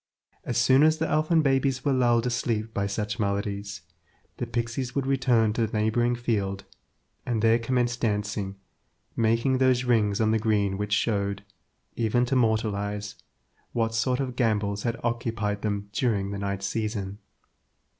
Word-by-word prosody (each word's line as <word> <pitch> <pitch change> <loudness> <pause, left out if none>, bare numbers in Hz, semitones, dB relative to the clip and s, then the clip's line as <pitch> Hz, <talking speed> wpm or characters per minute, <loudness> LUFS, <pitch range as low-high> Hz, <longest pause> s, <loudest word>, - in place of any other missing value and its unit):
As - - -2
soon 130 +1 +5
as 155 +1 +5
the 160 +1 -1
elfin 155 +1 +2
babes 135 -1 +1
were 140 - +3
lulled 120 -2 +3
asleep 115 -2 -1
by 100 0 -1
such 105 0 -3
melodies, 100 -2 -2 0.6
the 120 - -3
pixies 120 +2 -3
would 140 -2 0
return 125 -5 +2
to 115 0 0
the 110 - -3
neighbouring 120 +3 +1
field, 100 -5 -2 0.6
and 115 -3 -1
there 115 +1 +5
commence 120 +1 0
dancing, 105 -3 -2 0.6
making 115 +3 +2
those 130 -1 +3
rings 110 -5 +2
on 110 -1 +2
the 110 - +2
green 105 -3 +1
which 105 0 -3
showed, 100 -2 0 0.5
even 120 +2 +1
to 130 - -1
mortal 110 -3 +2
eyes, 100 0 -4 0.6
what 115 -1 0
sort 125 +3 +1
of 130 -3 -3
gambols 105 -4 0
had 115 0 -2
occupied 115 -3 -2
them 100 -1 -2
during 105 -6 0
the 100 - -4
night 100 -1 -3
season. 105 -1 -3
115 Hz, 155 wpm, -26 LUFS, 105-125 Hz, 0.6 s, soon